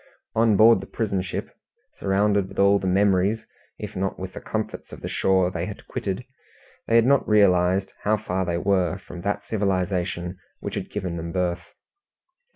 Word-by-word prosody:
On 110 -2 +3
board 110 -2 +7
the - - -9
prison 100 -5 -1
ship, 90 - -5 0.4
surrounded 100 0 +1
with - - -12
all 100 0 +5
the 95 - -3
memories 100 +2 +2 0.3
if 105 0 -7
not 95 +1 -2
with 95 0 -6
the - - -7
comforts - - -4
of - - -10
the - - -4
shore 95 -1 +2
they 90 - -3
had - - -8
quitted, 100 +5 -3 0.6
they 115 - +2
had 115 0 +6
not 140 -2 +3
realized 95 -2 +3
how 110 +1 +2
far 95 -3 -2
they 85 -1 -1
were 95 0 +1
from 90 -2 -10
that 105 +1 -2
civilization 90 -3 -1 0.2
which - - -5
had - - -4
given 95 -4 -4
them 85 0 -5
birth. 90 -1 -1
95 Hz, 175 wpm, -24 LUFS, 90-105 Hz, 0.6 s, board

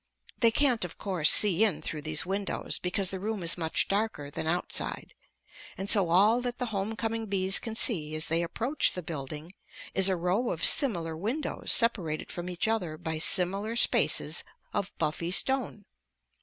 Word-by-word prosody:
They 230 - +5
can't, 245 -2 +2
of 175 -2 -8
course, 180 -6 +2
see 205 -1 +6
in 205 -8 +1
through 155 - -5
these 155 +1 0
windows 195 +2 -3
because 185 +1 -2
the 190 - -5
room 210 -1 -4
is 170 - +2
much 160 -2 0
darker 200 -8 -3
than 160 - -5
outside, 175 +2 -2 0.6
and 195 +1 0
so 195 -6 +4
all 210 +8 +3
that 245 -1 -4
the 250 - -3
home 200 +3 -3
coming 225 0 -4
bees 195 -1 +2
can 225 -2 -7
see 155 -10 +1
as 155 - -1
they 165 +1 -1
approach 230 - -2
the 180 - -6
building 155 +2 -8 0.4
is 195 0 +5
a 190 - +1
row 180 +8 -1
of 165 - +2
similar 170 - +5
windows 230 - -3
separated 185 -10 +2
from 175 +1 -7
each 180 +3 -3
other 180 -9 -3
by 160 0 -5
similar 195 +6 +1
spaces 235 - +1 0.3
of 200 - -3
buffy 165 +3 -3
stone. 245 +1 -1
190 Hz, 175 wpm, -27 LUFS, 165-220 Hz, 0.6 s, see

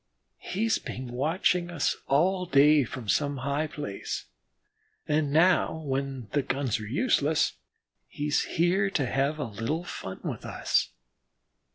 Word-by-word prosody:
He's 220 +4 0
been 125 0 -6
watching 170 +7 +1
us 170 -5 0
all 180 +6 +2
day 145 0 +6
from 125 -2 -7
some 145 +5 +1
high 140 +4 -1
place, 100 - -5 0.8
and 150 -1 +1
now 160 +1 +4
when 135 -3 -3
the 145 - +2
guns 135 -4 -1
are 110 - -6
useless 150 - +2 0.5
he's 145 0 0
here 185 +4 +2
to 150 -8 0
have 135 +4 0
a 150 - -2
little 115 - -3
fun 95 - -7
with - - -4
us." - - 0
145 Hz, 135 wpm, -28 LUFS, 130-165 Hz, 0.8 s, day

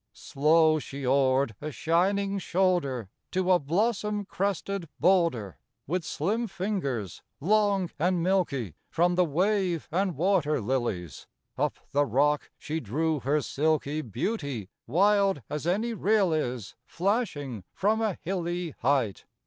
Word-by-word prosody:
Slow 155 +2 +3
she 140 -1 -7
oared 130 -1 +3
a 155 +1 -4
shining 195 +6 +1
shoulder 175 - 0 0.2
To 185 0 +1
a 180 - +5
blossom 210 +6 0
crested 195 -2 -2
boulder. 170 - +2 0.3
With 175 +4 -1
slim 215 +11 -1
fingers, 175 - -3 0.2
long 200 0 +2
and 175 +1 +1
milky, 160 - 0 0.2
From 175 +2 +2
the 180 +1 +4
wave 180 +1 0
and 185 +1 0
water 170 -4 +2
lilies, 105 - -3 0.3
Up - - -1
the 145 0 +2
rock 145 +5 +2
she 160 +2 -3
drew 155 +6 -1
her 145 +4 +1
silky 155 +1 0
Beauty, 135 - -3 0.2
wild 195 - +3
as 150 +2 -3
any 215 +7 0
rill 205 -4 +2
is 125 -9 -2
Flashing 165 - -1
from 215 +3 +1
a 215 -5 0
hilly 175 -1 -2
height. 125 -6 +1
165 Hz, 125 wpm, -28 LUFS, 140-195 Hz, 0.3 s, a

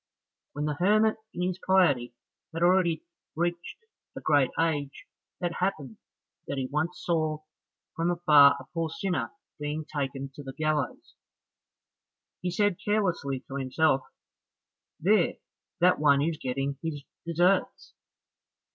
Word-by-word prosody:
When 150 +1 -3
the 150 -1 -2
hermit 215 +4 +3
in 180 - -3
his 185 0 -2
piety 145 -12 +2 0.4
had 165 - 0
already 175 -3 +3 0.3
reached 175 - -3 0.3
a - - -3
great 145 -4 +3
age, 150 -4 -1 0.3
it 175 -2 -2
happened 150 - -2 0.5
that 140 - -3
he 130 - -1
once 160 +7 -2
saw 155 -2 0 0.5
from 165 +1 0
afar 150 -5 +6
a - - -11
poor 165 -1 -1
sinner 180 +3 -2 0.3
being 150 +1 -3
taken 135 -2 -4
to 145 - -9
the 135 -1 -8
gallows. 155 -2 -2 1.3
He 180 - -1
said 205 0 +1
carelessly 180 -11 0
to 135 +1 -7
himself, 135 +1 +2 1.0
"There, 185 +2 +3 0.5
that 180 +1 +5
one 140 -2 +4
is 160 0 -1
getting 135 0 -3
his 150 -4 -4 0.2
deserts!" 175 +3 +1
160 Hz, 130 wpm, -28 LUFS, 140-175 Hz, 1.3 s, afar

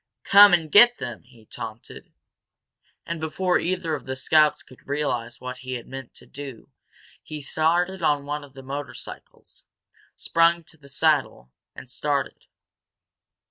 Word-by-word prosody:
"Come 205 0 +8
and 165 -3 +2
get 240 +3 +7
them!" 120 -4 -6
he 120 -3 -20
taunted. 110 +1 -9 0.9
And, 170 0 -4
before 180 +3 0
either 180 -2 -2
of 145 - -5
the 130 - -3
scouts 150 +3 +3
could 130 - -19
realize 125 -5 -2
what 125 0 -6
he 130 0 -5
meant 135 -2 -10
to - - -11
do 135 -5 -10 0.5
he 155 - -9
had - - -9
started 175 +5 +1
one 145 -1 0
of 140 -2 -15
the 135 -1 -11
motorcycles, 140 0 -9 0.5
sprung 170 0 +2
to 160 - -14
the 140 -2 -16
saddle, 140 - 0 0.2
and - - -10
started. 140 +2 -3
145 Hz, 140 wpm, -24 LUFS, 130-165 Hz, 0.9 s, Come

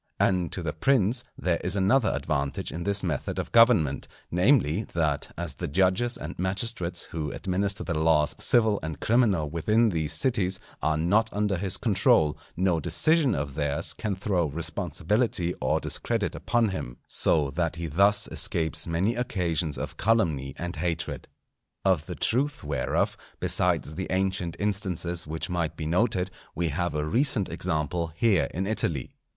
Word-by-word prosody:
And 90 -4 +2
to 90 - -3
the 75 - -2
prince 120 +4 +2
there 85 -2 0
is 90 +2 -1
another 100 +6 +3
advantage 70 0 -2
in 85 +2 -5
this 100 -1 +1
method 80 -7 -2
of - - -4
government, 115 - +4 0.2
namely, 95 - +3
that 80 -4 0
as 85 -2 -4
the - - -5
judges 95 - +1
and 80 +4 -7
magistrates 95 -2 -1
who 80 -2 -3
administer 95 +2 -2
the 85 - -2
laws 80 -1 +2
civil 110 -4 +3
and 80 -2 -5
criminal 105 -10 +2
within 105 +9 +2
these 80 -5 -2
cities, 100 -8 0 0.2
are 80 0 +1
not 105 +8 +2
under 105 -1 0
his 95 +1 0
control, 95 -8 +3 0.2
no 90 -2 +2
decision 135 - +2
of 70 0 -3
theirs 75 +2 -1
can 105 -3 -3
throw 95 -3 0
responsibility 85 - -1
or - - +1
discredit - - -1
upon 120 -2 +1
him; - - -5
so 75 -4 +3
that 85 +1 -1
he 85 0 -5
thus 100 +6 +3
escapes 80 -1 0
many 90 +7 +1
occasions 90 - -1
of - - -5
calumny 80 - +1
and 85 0 -5
hatred. 85 0 -3 0.6
Of 90 -6 +2
the - - -5
truth 135 +5 0
whereof, 70 -3 0 0.2
besides 75 - +1
the 95 +4 -4
ancient 95 -2 -1
instances 90 -5 -1
which 80 +1 -3
might 85 -3 -2
be 80 - -4
noted, 90 +2 +1 0.2
we 85 0 0
have 90 +2 -2
a 75 0 -1
recent 115 - +1
example 80 +2 -1
here 95 -7 +3
in 95 +3 -2
Italy. 85 - -1
90 Hz, 155 wpm, -27 LUFS, 80-100 Hz, 0.6 s, government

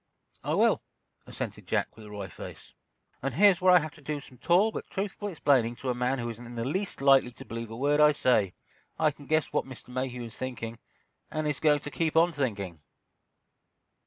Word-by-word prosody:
"I - - 0
will," - - +4 0.5
assented - - -6
Jack, - - 0
with 110 -1 -12
a - - -11
wry 100 -2 -6
face, 90 - -10 0.5
"and 135 -1 -2
here's 195 +1 +6
where 185 0 +6
I 180 - +9
have 155 -3 -2
to 155 - -17
do 150 +1 -3
some 130 -3 -14
tall 180 - +4
but - - -6
truthful 205 +1 -3
explaining 135 - +2
to 130 - -4
a - - 0
man 125 +2 0
who 120 -2 -3
isn't 115 +1 -10
in 120 - -9
the 115 - -2
least 180 - -2
likely 135 -2 +6
to - - -11
believe 115 0 -6
a 115 - -7
word 145 +3 +2
I 150 0 +7
say. 125 -9 +2 0.4
I 155 -1 +3
can 145 -1 -15
guess 155 0 +1
what - - +1
Mr. 130 -2 -11
Mayhew 125 -1 -3
is 115 -2 -8
thinking, 115 -3 -5 0.5
and 155 0 -2
is 145 -2 -1
going 150 -2 +3
to 145 - -7
keep 160 +1 -1
on 170 +2 +5
thinking!" 100 - -3
135 Hz, 215 wpm, -29 LUFS, 120-155 Hz, 0.5 s, I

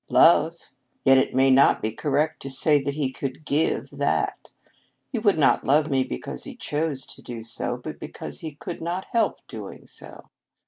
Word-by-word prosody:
"Love. 165 0 +5 0.5
Yet 135 0 +7
it - - -1
may 135 0 +5
not 135 +1 +5
be 110 - -2
correct 150 +5 -1
to 135 - -6
say 145 +2 +3
that 140 +1 -3
he 140 -4 -1
could 135 +3 -6
give 150 +3 0
that. - - -1 0.6
He 240 - -1
would 205 -5 +3
not 145 -4 +3
love 150 +2 +3
me 135 -1 +3
because 60 - -6
he - - -8
chose 150 -3 -2
to - - -12
do 115 -2 -7
so, 120 +2 -3
but 155 +5 -8
because - - -7
he 155 -3 -7
could 170 +3 -7
not 175 +3 -3
help 230 - +1
doing - - -9
so. - - -13
145 Hz, 185 wpm, -25 LUFS, 130-160 Hz, 0.6 s, Yet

